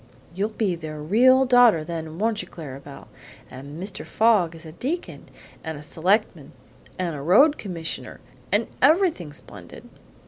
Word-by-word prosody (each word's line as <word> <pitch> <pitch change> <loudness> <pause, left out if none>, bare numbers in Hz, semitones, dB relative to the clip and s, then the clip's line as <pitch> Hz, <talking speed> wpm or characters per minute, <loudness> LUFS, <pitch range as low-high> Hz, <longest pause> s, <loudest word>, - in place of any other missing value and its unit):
"You'll 200 +4 -1
be 215 -4 -1
their 155 -2 -7
real 250 - +4
daughter, 245 -9 +5
then, 160 -1 -6
won't 220 +2 0
you, - - -10
Clara 140 -5 -9
Belle? 140 0 -12 0.4
And 140 +4 -9
Mr. 190 +1 -5
Fogg 210 -7 +2
is 165 0 -11
a 160 - -9
deacon, 285 - -5 0.3
and 160 -2 -5
a 145 - -10
selectman, 175 0 0 0.4
and 175 -4 -2
a 140 - -6
road 270 - +4
commissioner, 170 -5 -6 0.3
and - - +2 0.2
everything 315 - +3
splendid." 145 - -13
175 Hz, 150 wpm, -23 LUFS, 155-225 Hz, 0.4 s, daughter